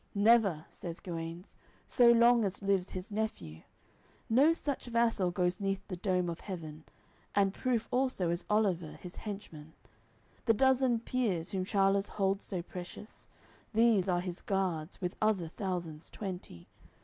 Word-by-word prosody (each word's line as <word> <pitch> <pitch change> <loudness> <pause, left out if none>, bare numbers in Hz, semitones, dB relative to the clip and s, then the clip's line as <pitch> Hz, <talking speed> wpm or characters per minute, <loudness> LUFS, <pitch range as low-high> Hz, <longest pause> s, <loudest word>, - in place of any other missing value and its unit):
"Never," 200 -6 +4
says 170 -1 -7
Guenes, 170 +1 -6 0.3
"so 240 -2 +5
long 235 0 +5
as 200 0 -3
lives 195 -2 +1
his 185 +2 -7
nephew; 150 - -3 0.7
No 275 +8 +6
such 290 -4 -3
vassal 230 -5 +2
goes 180 +2 0
neath 195 -1 -2
the 185 - -4
dome 180 0 0
of 170 -1 -4
heaven; 160 -5 -7 0.5
And 195 -1 +3
proof 245 -2 -1
also 250 -9 +1
is 170 +1 -2
Oliver 190 -7 +1
his 180 -1 -10
henchman; 165 -7 -8 0.7
The 225 -2 +4
dozen 260 -1 +3
peers, 210 -10 -1
whom 190 -2 -1
Charl'es 195 0 +2
holds 195 0 0
so 180 -4 -4
precious, 180 +4 -10 0.5
These 220 -4 +4
are 175 -1 +2
his 180 0 -5
guards, 185 -4 -2
with 180 0 -2
other 205 -6 +1
thousands 170 -4 -4
twenty. 180 - -7
195 Hz, 145 wpm, -32 LUFS, 175-220 Hz, 0.7 s, No